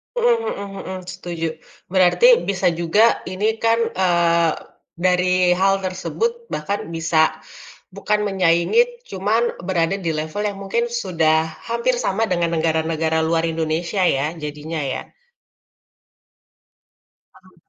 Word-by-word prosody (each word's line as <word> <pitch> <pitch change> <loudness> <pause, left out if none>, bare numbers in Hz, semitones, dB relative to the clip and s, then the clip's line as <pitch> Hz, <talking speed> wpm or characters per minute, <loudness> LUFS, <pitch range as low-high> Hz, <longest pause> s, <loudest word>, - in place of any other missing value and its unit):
Mmm, 480 -1 +3 0.2
mhm 195 -1 -7
mhm, 185 0 -5
setuju, 170 -2 -4 0.4
berarti 195 - +5
bisa 195 -1 0
juga 210 +7 +3
ini 210 +4 -1
kan, 230 0 +2 0.3
eee, 170 -2 +3 0.4
dari 180 +1 +2 0.2
hal 195 0 +4
tersebut 460 - -3
bahkan 200 +7 -3
bisa 165 -1 +2 0.7
bukan 210 0 -1
menyaingi 195 - +2
cuman 205 +5 0 0.3
berada 175 0 +1
di 170 -4 -2
level 155 +6 -3
yang 200 -1 -4
mungkin 230 +5 -1 0.2
sudah 160 -4 +2 0.3
hampir 235 +2 +1
sama 220 -3 -1
dengan 170 -2 0
negara-negara 160 0 0
luar 165 0 +1
Indonesia 165 +4 -1
ya 135 -3 +1
jadinya 150 +1 -5
ya? 130 - -3 2.4
Paham. 185 0 -22
185 Hz, 115 wpm, -21 LUFS, 165-205 Hz, 2.4 s, berarti